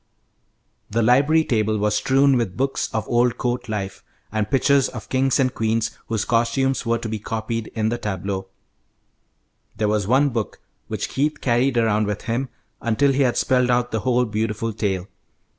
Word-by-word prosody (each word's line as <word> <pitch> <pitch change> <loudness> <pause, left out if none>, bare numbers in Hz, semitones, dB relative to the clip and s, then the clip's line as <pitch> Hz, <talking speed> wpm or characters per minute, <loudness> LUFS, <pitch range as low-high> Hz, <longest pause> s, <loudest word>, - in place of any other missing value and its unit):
The 115 +2 +1
library 140 +7 +4
table 110 -2 +1
was 105 0 +1
strewn 135 +4 +3
with 115 -7 -1
books 135 +1 -1
of 110 - -2
old 120 0 +2
court 125 -2 -2
life, 100 -2 -4 0.3
and 110 -1 -1
pictures 135 0 +3
of 110 -3 -9
kings 135 0 +2
and 130 -2 +2
queens 110 0 -1
whose 110 -2 -1
costumes 125 +2 +1
were 115 0 +2
to 115 - -5
be 110 -1 -3
copied 110 +1 -3
in 110 -1 +1
the 120 +1 -2
tableaux. 95 -2 -3 1.3
There 105 - +1
was 105 -2 0
one 135 +5 +4
book 115 -4 -3 0.3
which - - -3
Keith 150 +3 -1
carried 125 +1 +1
around 110 -2 +2
with 105 -1 -3
him 120 +3 -2 0.3
until 130 +5 +2
he 135 +1 +1
had 125 -3 +2
spelled 125 -1 +2
out 120 0 +1
the 110 - 0
whole 125 +2 +2
beautiful 110 0 -2
tale. 100 -3 -2
115 Hz, 175 wpm, -22 LUFS, 110-130 Hz, 1.3 s, library